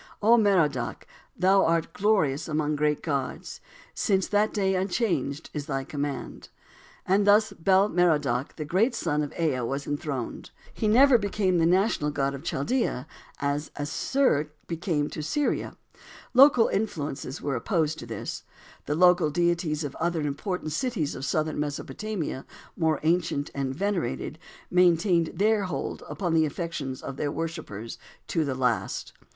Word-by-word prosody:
"O 225 +3 +5
Merodach! 175 - +1 0.3
thou 190 +2 +4
art 165 0 +1
glorious 185 -9 +1
among 150 -1 0
the 150 - -1
great 150 0 0
gods!" 140 -5 -3 0.3
"Since 195 -2 +1
that 210 +1 +2
day 195 -3 +1
unchanged 175 - -1
is 150 -1 -4
thy 135 -2 -2
command." 145 -2 -5 0.6
And 200 +2 +2
thus 210 +2 +5
Bel 190 +4 +3
Merodach, 150 - +1
the 155 - -5
great 210 - +2
son 150 -8 0
of 145 - -3
Ea, 155 -6 +1
was 135 +4 -3
enthroned. 145 -4 -4 0.2
He 220 - -1
never 250 +3 +6
becomes 195 -3 +1
the 165 - +4
national 185 -4 +2
god 140 -1 -1
of 140 - -7
Chaldea, 140 - -1 0.3
as 145 +1 -1
Asshur 150 - +1 0.2
became 165 -3 -1
to - - -5
Syria. 285 - -1 0.6
Local 255 -3 +7
influences 150 -10 -3
were 140 -2 -2
opposed 160 - 0
to 120 - -8
this. 115 - -5 0.5
The 150 - 0
local 180 -1 +5
deities 170 -1 0
of 145 -2 -4
other 170 0 0
important 155 +3 -3
cities 180 - -1
of 135 - -5
southern 155 +2 -1
Mesopotamia, 150 +1 -4 0.3
more 160 -3 +1
ancient 160 -3 0
and 135 -1 -2
venerated, 175 -5 -2 0.3
maintained 175 -1 +3
their 210 0 +2
hold 180 - -4
upon 175 -4 -2
the 160 -1 +4
affections 145 -4 -5
of 135 - -6
their 145 0 -1
worshippers 155 - -5 0.3
to 165 - +1
the 140 -3 -2
last. 125 -2 -1
160 Hz, 145 wpm, -27 LUFS, 145-190 Hz, 0.6 s, Local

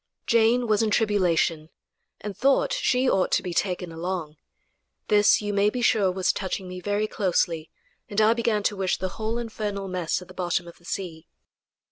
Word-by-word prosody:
Jane 230 +2 +3
was 215 -1 +2
in 220 - +1
tribulation, 180 -7 +1 0.5
and 205 -1 -5
thought 275 - +2
she 265 - +1
ought 190 -6 +2
to - - +2
be 180 - -4
taken 180 -2 -1
along. 165 -2 -4 0.7
This, 210 0 +4
you 205 0 -2
may 200 +1 +3
be 245 +2 -3
sure, 200 -5 +3
was 185 0 +1
touching 190 -1 -4
me 180 0 -7
very 205 +2 0
closely, 170 -6 -1 0.4
and 205 -1 -1
I 220 +1 +5
began 230 -3 0
to 205 - 0
wish 190 -2 0
the 185 - -3
whole 220 +4 -3
infernal 210 -4 -4
mess 180 -3 -1
at 180 - -12
the 185 - -13
bottom 175 -1 -2
of 170 - -13
the 170 - -22
sea. 170 -5 -5
200 Hz, 185 wpm, -25 LUFS, 180-215 Hz, 0.7 s, I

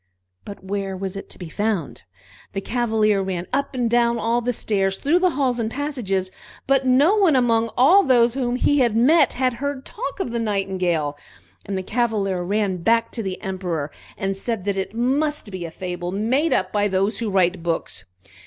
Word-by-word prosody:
But 200 -2 -9
where 195 0 -3
was 190 0 -5
it 195 - -7
to - - -9
be 175 - -7
found? 205 -2 -2 0.5
The 195 - -1
Cavalier 220 -3 +1
ran 185 -2 -3
up 280 0 -1
and 245 -2 +1
down 235 0 +2
all 230 +1 0
the 245 +1 0
stairs, 195 -4 0
through 325 +6 +2
halls 265 -6 0
and 220 -1 -1
passages, 225 -9 -2 0.3
but 270 -1 +2
no 285 +11 +4
one 370 -8 +4
among 230 -2 +2
all 315 +11 +7
those 240 -8 +4
whom 250 -2 -1
he 285 +2 +2
met 265 +7 +4
had 255 -1 +1
heard 285 -2 -3
talk 465 -2 -6
of 250 - -2
the 235 - -2
Nightingale. 185 -8 -1 0.5
And 195 -1 -2
the 190 - -3
Cavalier 205 -4 0
ran 200 0 0
back 230 +6 +2
to 230 - -3
the 190 -3 -4
Emperor, 180 -7 -3 0.3
and 195 -2 -2
said 200 0 -4
that 200 -1 0
it 195 +2 -4
must 275 0 0
be 185 -2 -5
a - - -5
fable 175 +1 -5
made 235 - +1
up 185 0 +1
by 205 -1 +1
those 195 +2 0
who 230 -2 -2
write 185 -2 +2
books. 165 - -3
220 Hz, 190 wpm, -22 LUFS, 190-250 Hz, 0.5 s, all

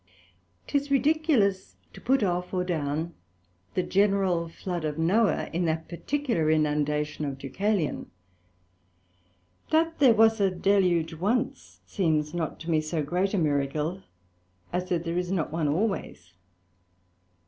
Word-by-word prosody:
'Tis 285 0 -1
ridiculous 275 - +2 0.2
to - - -12
put 265 -2 +2
off, 180 0 -1
or 180 - +1
down 160 -1 -2 0.6
the 185 - +1
general 190 -4 +1
Flood 175 0 -5
of 150 -1 -2
Noah 200 +7 +2
in 175 +1 0
that 160 0 -1
particular 230 - -1
inundation 150 -1 0
of 140 -2 -3
Deucalion: 180 +5 -2 1.6
that 325 +1 +1
there 255 -6 +6
was 225 0 +4
a 195 - +4
Deluge 180 -3 +2
once, 205 +9 -2
seems 155 -5 0
not 165 -3 -3
to 165 +1 -4
me 155 -1 +3
so 155 0 -2
great 180 +7 0
a - - +1
Miracle, 150 +3 0 0.7
as 180 +1 -2
that 170 -2 0
there 170 +1 -1
is 180 0 -3
not 175 -6 -1
one 160 -1 0
always. 155 - -2
175 Hz, 135 wpm, -27 LUFS, 155-200 Hz, 1.6 s, there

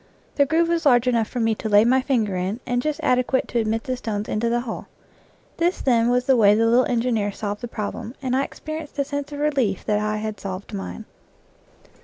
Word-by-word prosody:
The 280 -1 +3
groove 330 +3 +2
was 335 -3 +1
large 245 -2 +4
enough 230 -3 +2
for 250 - -5
me 225 -1 +2
to 220 0 -4
lay 205 +1 +6
my 260 +2 +4
finger 230 -8 0
in 185 +5 -2
and 245 -1 0
just 305 +2 -2
adequate 255 +1 +1
to 240 - 0
admit 225 0 -1
the 255 - -2
stones 215 -4 -4
into 230 +2 0
the 240 +1 +1
hole. 240 -2 -6 0.7
This, 350 +2 +1
then, 235 -3 +2
was 250 0 +2
the 265 - +4
way 210 -3 +5
the 225 +1 +2
little 240 +3 +4
engineer 230 -4 0
solved 205 0 -5
the 240 - -4
problem, 220 +2 -5
and 260 -2 -1
I 270 - +2
experienced 310 +1 -7
a 280 - +1
sense 285 0 -4
of 290 - -6
relief 275 -10 0
that 210 -1 +1
I 215 0 -1
had 215 0 -4
solved 195 +2 -6
mine. 205 +2 -6
240 Hz, 225 wpm, -23 LUFS, 215-265 Hz, 0.7 s, lay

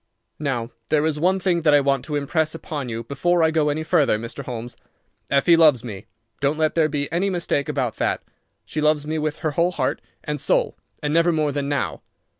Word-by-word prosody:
"Now 125 -5 -2 0.2
there 155 -1 +2
is 155 -2 0
one 185 +4 +2
thing 180 -2 +1
that 150 -2 +5
I - - +6
want 135 -2 +1
to 150 - -3
impress 155 +2 0
upon 145 -5 -5
you 115 0 -4
before 165 +7 +1
I 160 - +4
go 155 -2 +2
any 155 +2 -1
further, 150 -8 +3
Mr. 115 +5 -6
Holmes. 120 -1 -6 0.5
Effie 140 +5 +5
loves 150 -8 +5
me. 105 -5 -8 0.3
Don't 140 +2 +1
let 155 -1 +1
there 160 -2 +2
be 145 -1 -1
any 180 +4 +1
mistake 170 -6 -1
about 130 -6 -1
that. - - -1 0.4
She 155 - -3
loves 150 -1 +2
me 155 +1 -2
with 155 0 -1
her 155 - +2
whole 170 +4 +1
heart 130 -6 -1 0.2
and 150 -2 -4
soul, 145 - +1 0.3
and 150 0 0
never 165 +1 +4
more 155 -2 +1
than 140 0 -2
now. 145 -1 -2
150 Hz, 215 wpm, -22 LUFS, 140-160 Hz, 0.5 s, I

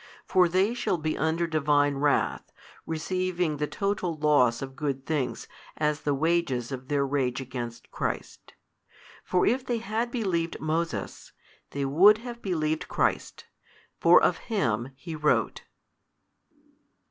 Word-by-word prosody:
For 180 -2 +4
they 190 +6 +2
shall 235 -6 -1
be 155 -1 -2
under 160 +2 0
Divine 145 -3 +2
wrath, 145 0 0 0.4
receiving 175 0 -1
the 150 +1 -1
total 195 -3 -2
loss 145 -6 +3
of 135 0 -8
good 140 -2 -3
things 150 -5 -2 0.3
as 150 -1 0
the 145 -1 0
wages 150 -5 0
of 130 -1 -6
their 140 -1 +1
rage 135 -3 -1
against 120 -3 -7
Christ. - - -5 0.7
For 180 - +1
if 250 +3 +1
they 245 -2 -1
had 225 +1 -2
believed 185 -9 -2
Moses, 155 - -3 0.4
they 140 -1 -3
would 185 +10 +6
have 235 +1 -8
believed 155 -4 -1
Christ, - - -1 0.5
for - - +7
of - - +2
Him 120 - 0
he 160 +4 -7
wrote. 150 -1 0
155 Hz, 135 wpm, -27 LUFS, 140-180 Hz, 0.7 s, for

